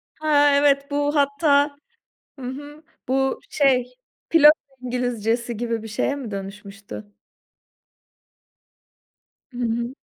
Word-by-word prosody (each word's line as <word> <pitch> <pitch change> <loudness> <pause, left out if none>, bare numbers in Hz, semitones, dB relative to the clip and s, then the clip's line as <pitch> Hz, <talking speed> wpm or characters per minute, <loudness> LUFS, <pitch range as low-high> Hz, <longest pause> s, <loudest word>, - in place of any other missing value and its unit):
Ha, 295 -2 +3
evet. 280 0 +2
Bu 290 +1 0
hatta 285 0 +2 0.6
Hı 255 - -7
hı. 290 +4 -8 0.2
Bu 270 +1 0
şey, 255 -3 +2 0.4
pilot 300 -2 +8 0.3
İngilizcesi 240 -2 -2
gibi 230 -1 -3
bir - - -7
şeye 220 +6 -1
mi 260 -6 -7
dönüşmüştü? 200 +1 -8 2.4
Hı 245 - -11
hı. 235 +1 -2
260 Hz, 100 wpm, -22 LUFS, 230-285 Hz, 2.4 s, pilot